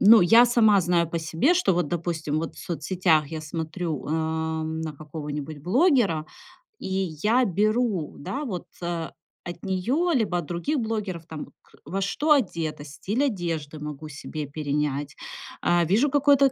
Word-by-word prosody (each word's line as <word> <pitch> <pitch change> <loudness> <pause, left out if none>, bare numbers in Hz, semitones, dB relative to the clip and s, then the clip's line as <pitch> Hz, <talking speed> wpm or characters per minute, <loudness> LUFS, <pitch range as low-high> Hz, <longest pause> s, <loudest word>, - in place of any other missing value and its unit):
Ну, 220 +2 +8
я 225 +7 +7
сама 220 -4 +5
знаю 170 -1 +2
по 170 - -2
себе, 165 - +2
что 355 - +3
вот, 175 -2 +1
допустим, 160 -3 -2
вот 165 +1 -4
в - - -12
соцсетях 170 -3 +1
я 160 0 -5
смотрю, 160 0 -4
эм, 160 0 -1
на 160 -1 -4
какого-нибудь 150 0 -6
блогера, 200 - +2 0.5
и - - -6 0.4
я 240 +4 +4
беру, 210 -2 0
да 275 - -4
вот, 185 -9 -4 0.2
э, 170 -2 -2 0.4
от 175 - -8
нее, 240 - 0
либо 220 - +1
от 170 - -5
других 175 - -2
блогеров, 210 -8 -3
там, 160 -2 -7
вот - - -21
к - - -28
во 195 +2 -3
что 290 +11 0
одета, 165 - -1
стиль 190 - -2
одежды 165 - -2
могу 150 0 -7
себе 150 +1 -6
перенять, 145 -1 -2 0.5
а, 175 -1 +3
вижу 220 - +3
какое-то 280 -1 +5
170 Hz, 160 wpm, -25 LUFS, 155-215 Hz, 0.5 s, Ну